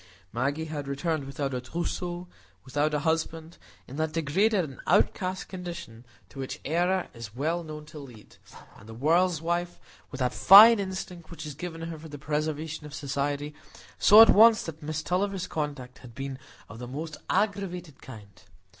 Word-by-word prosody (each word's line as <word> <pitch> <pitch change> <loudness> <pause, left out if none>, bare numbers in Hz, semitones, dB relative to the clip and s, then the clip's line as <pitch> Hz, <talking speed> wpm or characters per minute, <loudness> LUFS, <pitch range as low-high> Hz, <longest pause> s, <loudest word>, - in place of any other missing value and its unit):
Maggie 140 +7 -1
had 150 -3 -5
returned 140 +1 -2
without 135 0 -4
a 125 - -2
trousseau, 175 +5 -4 0.4
without 145 +3 0
a - - +1
husband,—in 160 -3 -4
that 155 0 -1
degraded 185 +6 +2
and 135 - -12
outcast 185 0 +1
condition 170 -11 -8 0.2
to 95 - -12
which 135 - -5
error 175 +4 +1
is 115 -3 -9
well 165 +6 -1
known 155 -1 -8
to 150 0 -11
lead; 120 -7 -14 0.4
and 110 - -15
the 110 - -9
world's 165 +5 +2
wife, 175 +1 -2 0.3
with 135 - -8
that 125 -2 0
fine 215 +4 +9
instinct 185 -3 -6
which 170 - -8
is 150 - -6
given 165 +2 -7
her 165 -1 -6
for 160 +1 -11
the 145 - -8
preservation 150 +1 -3
of 150 - -9
Society, 145 +1 -3 0.5
saw 215 +2 +9
at 225 - +6
once 220 +1 +6
that 160 -1 -8
Miss 155 +1 -4
Tulliver's 190 +1 -1
conduct 145 -5 -5
had 120 -3 -14
been 135 0 -5 0.3
of 115 - -11
the 125 - -7
most 155 +4 -6
aggravated 190 -6 -2
kind. 105 -6 -13
155 Hz, 170 wpm, -27 LUFS, 140-175 Hz, 0.5 s, fine